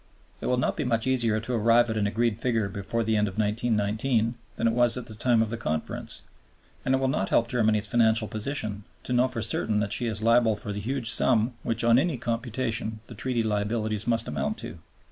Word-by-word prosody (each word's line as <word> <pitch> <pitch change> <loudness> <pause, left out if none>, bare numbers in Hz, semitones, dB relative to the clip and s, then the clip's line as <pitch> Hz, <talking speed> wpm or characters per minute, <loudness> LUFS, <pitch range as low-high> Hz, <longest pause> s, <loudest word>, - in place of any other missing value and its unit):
It - - -3
will 125 - +2
not 125 - 0
be - - -1
much 115 -3 0
easier 120 -4 +1
to 115 +3 -5
arrive 115 +1 +4
at - - -2
an 105 -2 +1
agreed 115 +1 0
figure 115 -5 0
before 100 +4 -2
the 110 0 +1
end 105 0 +2
of 95 - -7
1919 110 +2 0 0.2
that 115 - -2
it 115 - +3
was 120 0 +4
at 125 - -5
the 110 - -10
time 115 +1 +2
of 110 - -4
the 115 - -3
Conference; 80 -8 -3 0.6
and 130 - +2
it - - +2
will 135 0 0
not 95 -7 -1
help 115 - +3
Germany's 110 -3 +1
financial 110 +1 +3
position 110 -2 -4 0.2
to 125 - -3
know 125 +1 +4
for 125 -3 -4
certain 110 -1 0
that 100 -1 -1
she 120 - -1
is 110 -1 -2
liable 115 -1 +4
for 105 - -5
the 100 - -4
huge 120 +1 -2
sum 120 0 +3
which 115 0 -1
on 115 +1 +5
any 155 -1 0
computation 115 -2 -3
the - - -11
Treaty 125 -3 -1
liabilities 110 0 -1
must 115 -1 +1
amount 70 -2 -2
to. 80 +2 -8
115 Hz, 220 wpm, -26 LUFS, 105-120 Hz, 0.6 s, on